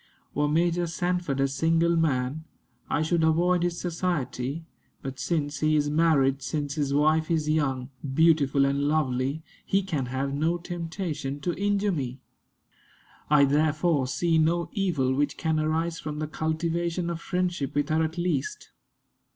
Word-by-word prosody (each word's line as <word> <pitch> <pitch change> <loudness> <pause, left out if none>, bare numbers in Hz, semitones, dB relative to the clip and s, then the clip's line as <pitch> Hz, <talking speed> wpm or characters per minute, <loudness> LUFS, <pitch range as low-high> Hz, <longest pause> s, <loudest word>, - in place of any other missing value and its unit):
Were 150 +1 +1
Major 170 +3 +1
Sanford 175 -4 -1
a 135 - +3
single 165 +4 +2
man, 145 -2 0 0.5
I 150 - +1
should 160 +1 +1
avoid 170 +3 +3
his 175 0 -1
society; 165 -4 -2 0.4
but 135 -1 -6
since 145 -4 -1
he 155 0 +2
is 145 -1 +1
married, 145 -4 +3
since 145 +1 -3
his 145 -2 -1
wife 155 +2 +2
is 160 -3 0
young, 135 -4 0 0.2
beautiful, 150 -4 +4
and 140 +1 0
lovely, 145 0 0 0.2
he 195 0 +1
can 150 -9 -2
have 135 +2 -2
no 160 +4 +1
temptation 165 -5 -4
to 175 +4 -1
injure 205 +2 +1
me. 135 -6 -3 1.1
I 145 -1 +6
therefore 150 0 +2
see 165 +4 +1
no 170 +2 +1
evil 165 - +1
which 145 +1 0
can 160 -1 0
arise 160 +2 -1
from 150 -1 -5
the 155 - -2
cultivation 170 +2 -2
of 170 -1 -5
friendship 180 -7 -2
with 145 -1 0
her 155 +1 +2
at 160 +2 -3
least. 170 -6 -2
155 Hz, 150 wpm, -26 LUFS, 140-170 Hz, 1.1 s, I